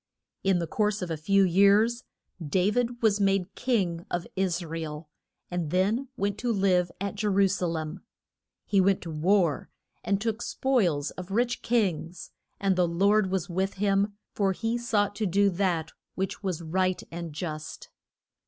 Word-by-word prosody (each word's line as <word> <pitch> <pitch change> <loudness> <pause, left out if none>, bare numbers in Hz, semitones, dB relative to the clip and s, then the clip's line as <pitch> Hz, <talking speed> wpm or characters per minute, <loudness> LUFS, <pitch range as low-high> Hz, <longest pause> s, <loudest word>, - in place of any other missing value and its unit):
In 195 -2 +3
the 170 - -1
course 210 +2 0
of 175 - -4
a - - 0
few 195 +6 +3
years 200 +6 +4 0.4
Da 180 +6 +1
vid 240 +1 -1
was 210 -2 +3
made 195 -1 +1
king 190 -10 0
of 175 -1 -2
Is 180 -2 0
ra 165 +1 -5
el, 150 -1 -7 0.4
and 175 -3 -2
then 205 - +1
went 205 0 -1
to 245 0 0
live 185 -4 +2
at 200 +1 -3
Je 210 +1 -2
ru 200 -1 +4
sa 185 -2 -1
lem. 160 +2 -4 0.6
He 200 -2 +3
went 195 0 +2
to 165 - -6
war, 170 -1 +1 0.3
and 200 -1 +1
took 225 +1 -2
spoils 180 - +1
of 185 0 -8
rich 235 +5 0
kings, 185 -7 -1 0.3
and 195 -1 +2
the 180 -1 +3
Lord 200 +4 +3
was 185 -3 -1
with 190 +2 -1
him, 200 +1 +1 0.2
for 195 -2 +1
he 225 +4 -2
sought 215 -4 0
to 215 - 0
do 200 +2 +3
that 175 -3 0 0.2
which 190 +1 -3
was 180 -4 -3
right 185 +3 0
and 170 -1 -5
just. 155 0 -6
190 Hz, 170 wpm, -27 LUFS, 175-205 Hz, 0.6 s, years